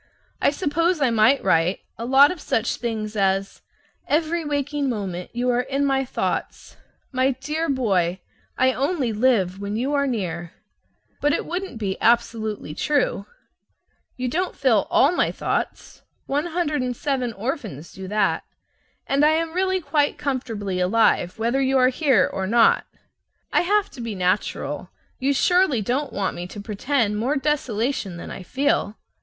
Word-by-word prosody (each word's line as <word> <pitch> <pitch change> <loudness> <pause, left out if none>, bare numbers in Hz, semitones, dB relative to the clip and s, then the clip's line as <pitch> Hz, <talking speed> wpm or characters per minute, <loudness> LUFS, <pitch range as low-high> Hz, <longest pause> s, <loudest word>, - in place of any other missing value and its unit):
I - - +5
suppose 330 +3 0
I 265 -4 +2
might 230 +5 +4
write 175 0 +2
a 230 - -6
lot 270 +3 +6
of 360 -4 -7
such 225 +2 0
things 220 -2 -3
as: 195 -1 0 0.5
"Every 325 +2 +1
waking 290 -1 -1
moment 190 -6 -4
you 245 +1 0
are 245 0 +2
in 275 +2 -1
my 270 -1 +1
thoughts." - - -3 0.4
"My 260 0 +2
dear 310 +3 -2
boy, 190 -9 +1 0.4
I 260 0 +3
only 275 -3 0
live 210 -5 +2
when 200 +1 -4
you 260 +6 -1
are 280 -1 +2
near." 175 -8 -3 0.7
But 295 0 +3
it - - -1
wouldn't 360 -5 -4
be 195 -3 -3
absolutely 220 -7 +1
true. 270 - 0 0.9
You 255 0 -2
don't 360 +9 -1
fill 230 -7 +2
all 345 +1 +4
my 355 - +1
thoughts; - - -3 0.2
107 285 -5 -1
orphans 210 - -5
do 190 0 -8
that. 205 0 +1 0.6
And 280 +1 +2
I 310 +1 +4
really 370 +3 0
am 365 - -7
quite 295 -2 +1
comfortably 225 -9 -3
alive 185 -1 +2
whether 235 +4 +1
you 270 0 +2
are 255 0 +5
here 265 -1 +3
or 190 -1 -3
not. 230 +2 +4 0.7
I - - +4
have 410 +3 +1
to 250 - -9
be 230 -3 -4
natural. 185 +2 -1 0.3
You 275 +1 +1
surely 330 - +3
don't 260 +6 -1
want 200 -1 -2
me 175 +1 -5
to 205 - -9
pretend 210 +1 -1
more 260 +7 0
desolation 255 - -1
than - - -8
I - - -7
feel. 255 0 0
255 Hz, 155 wpm, -23 LUFS, 210-290 Hz, 0.9 s, lot